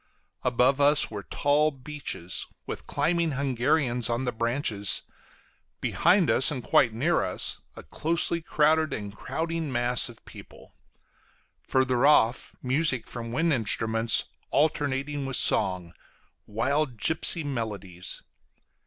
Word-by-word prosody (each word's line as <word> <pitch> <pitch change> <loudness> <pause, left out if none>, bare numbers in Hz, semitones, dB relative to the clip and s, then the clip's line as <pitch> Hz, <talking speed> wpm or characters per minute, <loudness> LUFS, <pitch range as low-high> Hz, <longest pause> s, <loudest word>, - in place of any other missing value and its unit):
Above 125 +3 +2
us 145 -1 +3
were 105 -2 -5
tall 145 +7 +1
beeches, 135 - -4 0.2
with - - -7
climbing 165 +2 0
Hungarians 125 -2 +1
on 120 +3 -1
the 125 - -1
branches; 115 -3 0 0.8
behind 175 +1 +2
and 130 -1 +4
quite 120 - +3
near 145 +10 0
us, - - -2
a - - -10
closely 170 - -1
crowded 155 0 +1
and 105 -1 -6
crowding 165 +3 -4
mass 120 0 +2
of 115 - -15
people; - - -14 0.9
further 130 -1 +1
off, 130 -5 +3
music 130 -2 +1
from 115 -1 -7
wind 160 +6 +1
instruments, 115 -1 +2 0.3
alternating 145 -1 -1
with 135 - -1
song 90 -4 +2 0.5
wild 130 +4 -1
gipsy 160 +5 +2
melodies. 105 -9 -4
130 Hz, 115 wpm, -26 LUFS, 115-150 Hz, 0.9 s, and